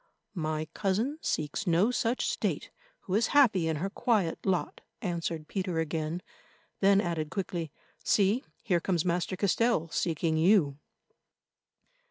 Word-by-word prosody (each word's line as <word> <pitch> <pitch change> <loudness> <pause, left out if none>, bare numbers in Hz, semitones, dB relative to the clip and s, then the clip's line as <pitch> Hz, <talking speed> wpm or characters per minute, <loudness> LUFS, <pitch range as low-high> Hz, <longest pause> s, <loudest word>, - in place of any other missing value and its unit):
"My 155 -3 -2
cousin 220 +10 -1
seeks 155 +6 -2
no 175 +7 +3
such 245 0 0
state - - -2 0.3
who 185 - -5
is 225 +3 +3
happy 205 - +5
in 160 - 0
her 180 +6 -2
quiet 205 -8 0
lot," 185 -2 -1 0.2
answered 165 -4 -3
Peter 185 -4 -2
again; 160 +1 -2 0.6
then 195 0 +5
added 165 -5 -1
quickly, 175 -5 -3 0.3
"See, 205 +5 +3 0.2
here 180 -6 +2
comes 175 -1 0
Master 180 +1 0
Castell 200 -2 +1
seeking 160 -1 0
you." 160 -5 +3
180 Hz, 130 wpm, -29 LUFS, 160-200 Hz, 0.6 s, happy